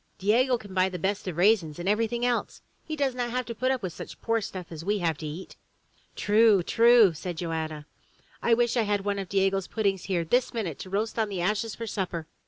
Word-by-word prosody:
Diego 245 Hz, +6 st, +3 dB
can 205 Hz, -4 st, -12 dB
buy 185 Hz, 0 st, +2 dB
the 185 Hz, -, -5 dB
best 195 Hz, +3 st, -2 dB
of 175 Hz, -3 st, -4 dB
raisins 180 Hz, -5 st, +3 dB
and 175 Hz, +1 st, -5 dB
everything 230 Hz, +3 st, +1 dB
else. 245 Hz, -1 st, -1 dB, 0.2 s
He 310 Hz, -, -5 dB
does 280 Hz, -3 st, 0 dB
not 245 Hz, -1 st, -2 dB
have 250 Hz, +1 st, -2 dB
to 235 Hz, -, -5 dB
put 255 Hz, +3 st, -1 dB
up 260 Hz, -4 st, -1 dB
with 180 Hz, -3 st, -3 dB
such -, -, -9 dB
poor 230 Hz, -1 st, 0 dB
stuff 185 Hz, -4 st, -7 dB
as 160 Hz, -1 st, -7 dB
we 205 Hz, +3 st, 0 dB
have 170 Hz, -4 st, 0 dB
to 155 Hz, -, -5 dB
eat!*' 160 Hz, +5 st, -8 dB, 0.6 s
"True! 210 Hz, -2 st, +4 dB
True! 230 Hz, -2 st, +5 dB
said 175 Hz, +2 st, -6 dB
Joanna. 160 Hz, -3 st, -4 dB, 0.6 s
"I 230 Hz, -, +4 dB
wish 240 Hz, +1 st, +1 dB
I 240 Hz, -, +3 dB
had 205 Hz, -2 st, -1 dB
one 200 Hz, -1 st, -1 dB
of 190 Hz, -2 st, -5 dB
Diego's 195 Hz, -1 st, +1 dB
puddings 200 Hz, -4 st, -1 dB
here 175 Hz, -4 st, -1 dB
this 245 Hz, +7 st, +1 dB
minute 185 Hz, -10 st, -3 dB
to 185 Hz, -, -8 dB
roast 215 Hz, +4 st, -2 dB
on 220 Hz, -1 st, +1 dB
the 190 Hz, -3 st, -3 dB
ashes 210 Hz, +4 st, -1 dB
for 230 Hz, -, -5 dB
supper!" 180 Hz, -6 st, -3 dB
200 Hz, 230 wpm, -27 LUFS, 180-230 Hz, 0.6 s, True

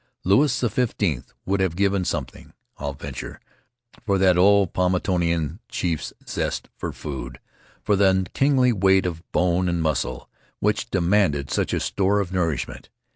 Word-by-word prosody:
Louis 130 Hz, +10 st, +4 dB
XV 125 Hz, -1 st, 0 dB, 0.5 s
would 100 Hz, +1 st, 0 dB
have 95 Hz, -3 st, 0 dB
given 100 Hz, -1 st, +1 dB
something, 70 Hz, -8 st, -5 dB, 0.3 s
I'll 70 Hz, -1 st, -4 dB
venture, 70 Hz, -2 st, -7 dB, 0.6 s
for 100 Hz, -2 st, +1 dB
that 95 Hz, -1 st, +4 dB
old 100 Hz, 0 st, +4 dB
Paumotuan 90 Hz, -4 st, 0 dB
chief's 85 Hz, -4 st, -2 dB, 0.2 s
zest -, -, -3 dB
for -, -, -4 dB
food, 70 Hz, -4 st, -7 dB, 0.4 s
for 105 Hz, -, +2 dB
the 95 Hz, -1 st, +3 dB
kingly 130 Hz, -3 st, +3 dB
weight 95 Hz, -2 st, +3 dB
of 85 Hz, -2 st, -3 dB
bone 90 Hz, 0 st, +1 dB
and 85 Hz, 0 st, -1 dB
muscle 65 Hz, -6 st, -1 dB, 0.3 s
which 105 Hz, +3 st, 0 dB
demanded 90 Hz, -7 st, +1 dB
such -, -, 0 dB
a -, -, 0 dB
store 100 Hz, +1 st, +1 dB
of 95 Hz, -2 st, -3 dB
nourishment. 85 Hz, -7 st, -2 dB
90 Hz, 140 wpm, -23 LUFS, 85-100 Hz, 0.6 s, Louis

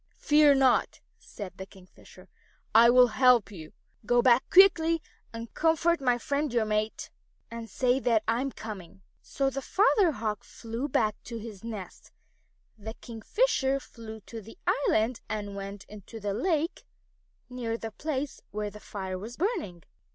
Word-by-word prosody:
"Fear 295 Hz, -1 st, +5 dB
not," 265 Hz, -2 st, +2 dB, 0.2 s
said 200 Hz, -4 st, -9 dB
the 190 Hz, -, -5 dB
Kingfisher. 185 Hz, -2 st, -17 dB, 0.5 s
"I 230 Hz, +2 st, +7 dB
will 250 Hz, 0 st, +6 dB
help 250 Hz, -2 st, +4 dB
you. 160 Hz, -6 st, -10 dB, 0.3 s
Go 240 Hz, +2 st, +2 dB
back 245 Hz, 0 st, +4 dB
quickly 335 Hz, -4 st, +6 dB, 0.3 s
and 230 Hz, 0 st, -8 dB
comfort 325 Hz, 0 st, +2 dB
my 250 Hz, -2 st, +2 dB
friend 285 Hz, +3 st, -2 dB
your 235 Hz, -2 st, +1 dB
mate, 215 Hz, 0 st, -2 dB, 0.4 s
and 230 Hz, -1 st, -7 dB
say 255 Hz, 0 st, +1 dB
that 230 Hz, -4 st, +2 dB
I 230 Hz, +2 st, +1 dB
am 275 Hz, 0 st, -2 dB
coming." 195 Hz, -5 st, -9 dB, 0.2 s
So 275 Hz, -1 st, -1 dB
the 275 Hz, +1 st, -4 dB
Father 395 Hz, -, +3 dB
Hawk 215 Hz, -3 st, -3 dB
flew 230 Hz, +4 st, -6 dB
back 215 Hz, -4 st, 0 dB
to 235 Hz, -, -6 dB
his 215 Hz, -3 st, -9 dB
nest, 215 Hz, -6 st, -8 dB, 0.7 s
and 210 Hz, -, -12 dB
the 220 Hz, -, -5 dB
Kingfisher 270 Hz, -, 0 dB
flew 220 Hz, -4 st, -11 dB
to 225 Hz, +2 st, -9 dB
the 225 Hz, +2 st, -14 dB, 0.3 s
island 220 Hz, +3 st, +1 dB
and 205 Hz, -2 st, -4 dB
went 200 Hz, 0 st, -7 dB
into 210 Hz, +2 st, -11 dB
the 205 Hz, -1 st, -3 dB
lake 320 Hz, -, -1 dB, 0.6 s
near 240 Hz, -2 st, -4 dB
the 225 Hz, -1 st, -6 dB
place 285 Hz, +3 st, -4 dB
where 210 Hz, +1 st, -4 dB
the 210 Hz, -, -11 dB
fire 190 Hz, -3 st, -6 dB
was 225 Hz, +5 st, -8 dB
burning. 320 Hz, -, -2 dB
230 Hz, 160 wpm, -28 LUFS, 210-270 Hz, 0.7 s, I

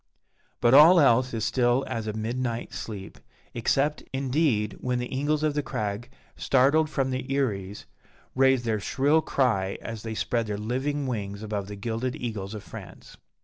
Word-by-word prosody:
But 120 Hz, -, +4 dB
all 160 Hz, +6 st, +9 dB
else 130 Hz, -3 st, +4 dB
is 110 Hz, -2 st, -2 dB
still 125 Hz, +1 st, +2 dB
as 115 Hz, -1 st, -4 dB
a 110 Hz, -, -2 dB
midnight 115 Hz, +2 st, -3 dB
sleep, 100 Hz, -4 st, -7 dB, 0.3 s
except, 135 Hz, +5 st, 0 dB
indeed, 130 Hz, -5 st, 0 dB
when 125 Hz, -1 st, -1 dB
the 125 Hz, +1 st, -4 dB
eagles 150 Hz, +3 st, 0 dB
of 155 Hz, -1 st, +1 dB
the 150 Hz, -, 0 dB
crag, 105 Hz, -2 st, -4 dB, 0.3 s
startled 145 Hz, +4 st, +3 dB
from 135 Hz, -3 st, -1 dB
their 130 Hz, 0 st, -1 dB
eyries, 105 Hz, -8 st, -2 dB, 0.5 s
raise 130 Hz, -1 st, +3 dB
their 110 Hz, -2 st, 0 dB
shrill 140 Hz, +9 st, +2 dB
cry 105 Hz, -11 st, 0 dB
as 115 Hz, -2 st, -7 dB
they 110 Hz, 0 st, -5 dB
spread 115 Hz, 0 st, -1 dB
their 105 Hz, -1 st, -3 dB
living 130 Hz, +7 st, -2 dB
wings 100 Hz, -4 st, -4 dB
above 105 Hz, -2 st, -3 dB
the 105 Hz, -, -7 dB
gilded 115 Hz, +4 st, -3 dB
eagles 110 Hz, -4 st, -5 dB
of 105 Hz, -, -7 dB
France. -, -, -11 dB
120 Hz, 165 wpm, -26 LUFS, 110-135 Hz, 0.5 s, all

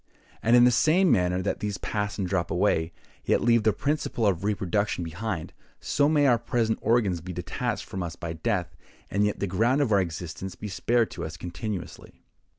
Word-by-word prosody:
And 115 Hz, +2 st, +4 dB
in 120 Hz, -, +7 dB
the 125 Hz, -, +6 dB
same 165 Hz, +9 st, +4 dB
manner 90 Hz, -1 st, +2 dB
that 100 Hz, -, -1 dB
these 105 Hz, -2 st, -3 dB
pass 105 Hz, 0 st, -3 dB
and 95 Hz, -3 st, -1 dB
drop 90 Hz, -2 st, -1 dB
away, 80 Hz, +1 st, +1 dB, 0.3 s
yet -, -, +2 dB
leave 115 Hz, -1 st, +3 dB
the 110 Hz, 0 st, +3 dB
principle 140 Hz, -3 st, -1 dB
of 95 Hz, -3 st, +1 dB
reproduction 100 Hz, -1 st, 0 dB
behind, 90 Hz, +1 st, -4 dB, 0.3 s
so 145 Hz, +1 st, +1 dB
may 150 Hz, -2 st, +3 dB
our 120 Hz, -4 st, +4 dB
present 115 Hz, -2 st, 0 dB
organs 105 Hz, -8 st, +2 dB
be 90 Hz, +2 st, -7 dB
detached -, -, -3 dB
from 95 Hz, -, -5 dB
us 85 Hz, -1 st, -4 dB
by 85 Hz, -1 st, -5 dB
death, 90 Hz, 0 st, -2 dB, 0.4 s
and 100 Hz, +1 st, +2 dB
yet 105 Hz, 0 st, 0 dB
the -, -, 0 dB
ground 115 Hz, +9 st, +2 dB
of 140 Hz, -6 st, +1 dB
our 100 Hz, -2 st, +5 dB
existence 85 Hz, +2 st, -5 dB
be 105 Hz, -, -7 dB
spared 115 Hz, +5 st, +1 dB
to -, -, -6 dB
us 80 Hz, +1 st, -6 dB
continuously." 90 Hz, +3 st, -7 dB
105 Hz, 195 wpm, -26 LUFS, 90-115 Hz, 0.4 s, in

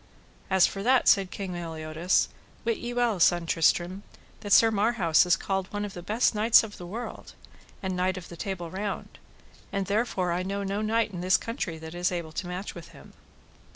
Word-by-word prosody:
As 190 Hz, -1 st, +5 dB
for 195 Hz, -, -3 dB
that, 255 Hz, +4 st, +3 dB
said 195 Hz, -2 st, +5 dB
King 195 Hz, -1 st, -5 dB
Meliodas, 165 Hz, 0 st, 0 dB, 0.4 s
wit 230 Hz, -1 st, +1 dB
you 240 Hz, 0 st, -5 dB
well, 240 Hz, -5 st, +1 dB
son 175 Hz, 0 st, +4 dB
Tristram, 175 Hz, +3 st, +1 dB, 0.4 s
that 205 Hz, -2 st, -7 dB
Sir 225 Hz, +3 st, +7 dB
Marhaus 200 Hz, -6 st, +3 dB
is 175 Hz, -, +5 dB
called 190 Hz, -1 st, -2 dB
one 205 Hz, 0 st, -2 dB
of 200 Hz, -, -7 dB
the 175 Hz, -, -7 dB
best 215 Hz, +8 st, +1 dB
knights 220 Hz, +2 st, +5 dB
of 210 Hz, -2 st, -8 dB
the 175 Hz, -, -8 dB
world, 230 Hz, +7 st, -7 dB, 0.5 s
and 190 Hz, -1 st, -2 dB
Knight 185 Hz, +1 st, 0 dB
of 180 Hz, -, -8 dB
the 170 Hz, -, -10 dB
Table 175 Hz, -3 st, -5 dB
Round; 200 Hz, +1 st, -5 dB, 0.5 s
and 195 Hz, -1 st, -1 dB
therefore 200 Hz, -3 st, 0 dB
I 175 Hz, +1 st, 0 dB
know 200 Hz, +2 st, -3 dB
no 200 Hz, +2 st, -2 dB
knight 225 Hz, +1 st, +1 dB
in 175 Hz, -2 st, -6 dB
this 185 Hz, +1 st, +4 dB
country 210 Hz, -8 st, -4 dB
that 160 Hz, +1 st, -9 dB
is 175 Hz, +1 st, 0 dB
able 170 Hz, -3 st, -4 dB
to 175 Hz, +3 st, -4 dB
match 180 Hz, +3 st, -5 dB
with 170 Hz, -, -10 dB
him. -, -, -16 dB
190 Hz, 200 wpm, -27 LUFS, 175-210 Hz, 0.5 s, Sir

